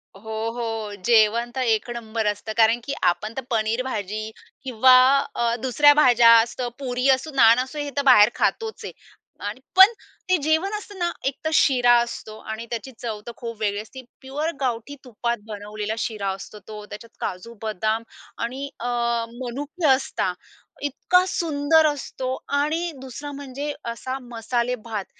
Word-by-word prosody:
हो, 220 +2 -4
हो, 225 -3 -4
जेवण 235 +1 +4
तर 260 - -1
1 225 -1 +1
नंबर 225 -1 -3
असतं. 210 +1 -3
कारण 225 +1 +4
की 280 - -4
आपण 195 +5 +1
तर - - -1
पनीर 225 +1 0
भाजी 215 -3 -4 0.3
किंवा 255 0 +5 0.4
अ, 235 0 +1
दुसऱ्या 290 +3 +5
अ, - - +6
भाज्या 240 -5 +6
असतात, 240 +2 -2
पुरी 250 -1 -1
असो, 270 +4 +2
नान 230 -2 +6
असो, 265 +4 -8
हे 290 -1 -3
तर - - +3
बाहेर 215 -5 +8
खातोच 445 -1 -1
आहे - - -7 0.5
आणि 210 +5 -5 0.2
पण 380 +3 +9 0.4
ते 370 - +4
जेवण 320 +7 +1
असतं 410 -1 -11
ना, 345 0 0
एकतर 275 +4 -2
शिरा 250 -5 +4
असतो 220 -2 -6
आणि 220 +1 -5
त्याची 240 +3 -5
चव 225 -3 -4
तर 235 - -4
खूप 230 -2 -6
वेगळी 205 -2 -1
असते. 260 +4 -11 0.2
प्युअर 290 +5 -3
गावठी 245 +2 -2
तुपात 235 -1 -3
बनवलेला 210 0 -5
शिरा 215 -3 -2
असतो 195 +2 -11
तो, 210 -1 -8
त्याच्यात 210 +2 -11
काजू-बदाम 220 +2 -3 0.4
आणि 265 +4 -4
अ, 240 - -4 0.5
मनुके 280 +7 -3
असतात. 265 0 +1 0.5
इतका 360 +6 +2
सुंदर 315 -2 +2
असतो 265 -3 -3 0.2
आणि 320 +4 0
2सरा 270 +3 -7
म्हणजे 280 +1 -5 0.2
असा 255 +3 -5
मसालेभात. 235 -3 -3
240 Hz, 155 wpm, -23 LUFS, 220-275 Hz, 0.5 s, पण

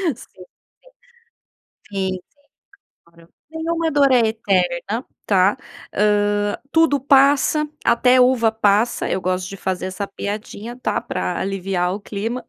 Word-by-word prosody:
sim, 185 -4 -15 1.5
sim, 190 -1 -1
sim, 185 - -6 0.9
claro. 170 0 -21 0.2
Nenhuma 325 0 -2
dor 280 -2 +4
é 250 - +5
eterna, 200 +1 -1 0.2
tá. 195 0 +3 0.4
Hã, 205 0 +1 0.2
tudo 320 -3 +3
passa, 280 +3 +3 0.2
até 250 +1 +4
uva 250 -3 +3
passa, 215 +1 +1
eu - - 0
gosto 185 0 -2
de 195 - -8
fazer 185 0 -3
essa 195 +2 -5
piadinha, 210 +3 -6
tá - - -1
pra - - -3
aliviar 190 -2 -1
o 200 - -5
clima 220 +5 -5
205 Hz, 125 wpm, -20 LUFS, 190-255 Hz, 1.5 s, é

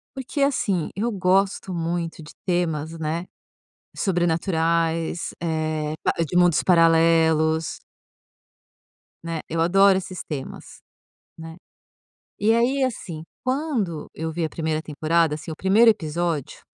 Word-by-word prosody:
Porque 270 +2 -4
assim, 205 - +1
eu 230 +4 -1
gosto 190 0 +1
muito 165 -1 -3
de 150 - -13
temas, 165 -3 -1
né, 160 +3 -3 0.7
sobrenaturais, 165 -2 0
eh, 155 -2 -1
pa - - +2
de 175 +3 -1
mundos 175 -3 +4
paralelos. 165 -2 +3 1.4
Né, 165 -1 -3
eu 165 +1 -2
adoro 195 +3 +5
esses 185 -1 -6
temas, 140 -4 -8 0.6
né. 165 0 -9 0.8
E 220 +2 +3
aí 255 +4 +2
assim, 175 -11 -3 0.2
quando 255 - -2
eu 160 0 -4
vi 170 0 -2
a - - 0
1ª 160 -1 -2
temporada, 155 +1 +1
assim, 155 +2 -9
o - - -8
1º 215 +5 +5
episódio 165 - -2
170 Hz, 120 wpm, -23 LUFS, 160-190 Hz, 1.4 s, adoro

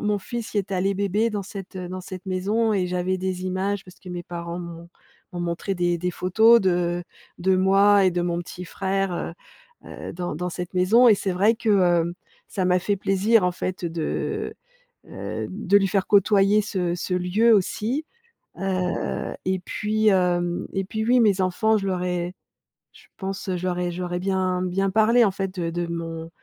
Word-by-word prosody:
mon 210 -1 +1
fils 230 +3 -6
y 205 - +2
est 195 0 -3
allé 190 +2 +1
bébé 200 +3 +1
dans 205 -2 -3
cette 195 0 -9
dans 185 0 -5
cette 185 0 -9
maison 205 +5 0
et 185 -3 +1
j'avais 180 +1 -1
des 185 0 -3
images, 190 +2 -2
parce 180 - -15
que 185 - -12
mes 175 -1 -5
parents 170 0 -6
m'ont 170 0 -9 0.4
m'ont 175 - -4
montré 175 +3 -2
des 175 -1 0
des 180 +1 -1
photos 220 +6 +5
de 175 -2 0 0.4
de 185 +1 +2
moi 195 +2 +5
et 185 - +4
de 175 0 0
mon 170 -1 -1
petit 175 +1 -8
frère, 195 +1 -1
heu, 170 - -4 0.6
heu, - - -7
dans 175 -3 -4
dans 180 +2 -3
cette 180 +1 -6
maison 225 +7 +5
et 215 - +7
c'est 195 -1 -2
vrai 205 +5 +3
que, 230 0 -3
heu, 175 -3 +3 0.3
ça 190 - -2
m'a 180 0 +3
fait 200 +3 0
plaisir 195 +3 +2
en 180 - +3
fait, 185 0 -4
de, 165 -2 -3 0.5
heu, - - -5
de 200 0 +2
lui 195 -1 +1
faire 195 0 0
côtoyer 205 +1 +4
ce 180 -4 -1
ce 180 +1 -3
lieu 185 +6 +3
aussi. 220 - 0 0.6
Heu, 185 -2 -2
et 185 0 0
puis, 215 +3 -1
hem, 175 -2 +1
et 195 0 0
puis 220 +2 -3
oui, 250 +2 +4
mes 200 -3 +3
enfants 215 +4 +2
je 195 -1 -3
leur 180 -1 -1
ai 180 0 -2 0.6
je - - -19
pense 195 0 -5
je 180 - -5
leur 180 -1 -1
ai 175 0 -1
je 175 +1 -5
leur 175 -1 -4
ai 175 - -1
bien 185 -1 0
bien 190 +2 0
parlé, 225 +4 +5
en 200 - +2
fait, 190 -1 -4
de 165 - -1
de 175 0 -2
mon 165 -1 -5
185 Hz, 200 wpm, -24 LUFS, 180-200 Hz, 0.6 s, et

